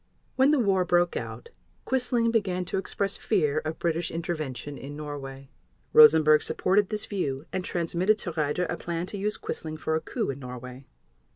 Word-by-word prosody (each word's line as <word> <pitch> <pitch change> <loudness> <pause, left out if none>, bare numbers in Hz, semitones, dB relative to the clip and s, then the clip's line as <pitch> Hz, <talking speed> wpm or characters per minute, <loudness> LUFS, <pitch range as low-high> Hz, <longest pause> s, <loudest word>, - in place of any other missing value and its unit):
When 265 +2 +5
the 300 - +4
war 195 -6 +2
broke 175 0 +2
out 470 - -6 0.4
Quisling 245 -3 +1
began 185 -5 0
to 190 - -1
express 195 +1 -2
fear 155 -8 +1
of 155 +1 -5
British 170 0 -1
intervention 155 -4 -4
in 140 +2 -8
Norway. 140 -2 -7 0.4
Rosenberg 155 0 +8
supported 195 +5 +1
this 215 -1 -3
view, 145 -8 -3
and 185 - -1
transmitted 180 +5 +1
to 180 - -5
Raeder 155 +2 0
a - - -3
plan 170 0 -3
to 200 - -6
use 210 +2 -1
Quisling 155 -1 -5
for 160 - -2
a 160 - +1
coup - - -2
in 135 - -8
Norway. 125 +1 -9
170 Hz, 175 wpm, -27 LUFS, 150-195 Hz, 0.4 s, Rosenberg